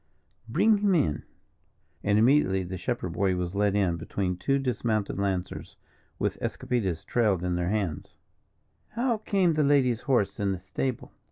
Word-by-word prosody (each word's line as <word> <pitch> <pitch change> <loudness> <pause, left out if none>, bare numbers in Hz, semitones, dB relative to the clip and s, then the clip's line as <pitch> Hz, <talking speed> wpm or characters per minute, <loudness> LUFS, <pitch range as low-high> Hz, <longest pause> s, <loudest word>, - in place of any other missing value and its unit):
"Bring 205 - +3
him 200 -2 +3
in." 75 - 0 0.8
And 100 0 +2
immediately 110 -6 +3
the 90 +1 -6
shepherd 90 -1 -3
boy 95 0 +1
was 90 0 -3
led 100 0 +1
in 95 -5 +1
between 90 +1 -2
two 135 +10 0
dismounted 110 -6 -1
lancers, 95 -2 -3 0.4
with - - -2
escopetas 95 -10 -2
trailed 105 -7 +1
in 90 0 0
their 90 0 -1
hands. 100 -7 -3 0.8
"How 235 0 +1
came 190 -5 +2
the 155 -1 +2
lady's 130 -5 +3
horse 120 -8 0
in 100 -1 +1
the - - -3
stable?" 110 +7 -4
105 Hz, 155 wpm, -27 LUFS, 95-135 Hz, 0.8 s, Bring